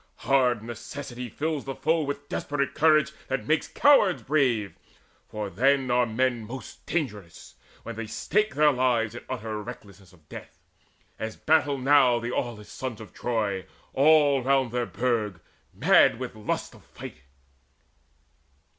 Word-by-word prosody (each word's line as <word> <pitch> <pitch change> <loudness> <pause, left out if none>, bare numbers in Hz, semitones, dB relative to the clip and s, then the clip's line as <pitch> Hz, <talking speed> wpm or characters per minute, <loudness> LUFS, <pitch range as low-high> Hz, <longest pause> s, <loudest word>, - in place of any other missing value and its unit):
Hard 125 -5 +2
necessity 120 +2 -7
fills 155 +4 -3
the 135 -1 -5
foe 160 +2 +1
With 145 0 -4
desperate 140 -2 -2
courage 155 0 +3 0.2
that 135 0 -2
makes 155 +1 +1
cowards 245 -11 +4
brave; 125 -8 +1 0.5
For 105 -1 -4
then 130 +6 +2
are 125 0 +3
men 120 +1 0
most 125 0 -9
dangerous, 105 - -4 0.3
when 115 - -7
they 115 -1 -5
stake 210 - -1
Their 150 0 +5
lives 125 -4 +1
in 120 - -9
utter 110 -4 -4
recklessness 100 -5 -11
of 80 -5 -24
death, - - -11 0.6
As 110 0 -4
battle 150 -3 +2
now 130 -2 +4
the 120 +1 -4
aweless 115 -4 -4
sons 130 -4 -5
of 110 - -11
Troy 105 -6 -2 0.3
All 145 -1 +4
round 130 -1 +1
their 120 -1 -1
burg, 110 -7 -1 0.3
mad - - +4
with 130 -1 -5
the 110 - -14
lust 105 - -3
of - - -17
fight." - - -11
125 Hz, 145 wpm, -26 LUFS, 110-140 Hz, 0.6 s, Their